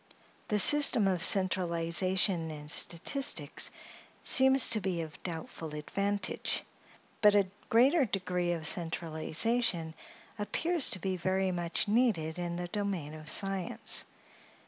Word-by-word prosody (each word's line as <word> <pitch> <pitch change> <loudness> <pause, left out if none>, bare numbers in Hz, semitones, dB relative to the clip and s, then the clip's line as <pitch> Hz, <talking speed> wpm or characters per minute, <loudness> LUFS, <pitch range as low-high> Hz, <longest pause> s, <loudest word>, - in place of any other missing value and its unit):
The 210 - -1
system 245 -1 +7
of 185 -3 -2
centralization 180 -1 +2
in 150 -1 -9
statistics 265 - +2 0.5
seems 265 0 +5
to 220 -2 +1
be 180 -3 -3
of 155 -1 -12
doubtful 160 -2 -8
advantage; 200 +7 -3 0.6
but 210 -1 +4
a 200 -2 +2 0.2
greater 270 +7 +3
degree 180 -4 -3
of 165 -2 -7
centralization 165 +3 -1 0.5
appears 325 +9 0
to 185 - -2
be 185 +1 -4
very 190 +1 -2
much 175 +2 -3
needed 205 -8 -1
in 175 -1 -5
the 175 0 -6
domain 185 -6 -5
of 155 0 -11
science. 195 -1 -2
185 Hz, 120 wpm, -29 LUFS, 165-205 Hz, 0.6 s, system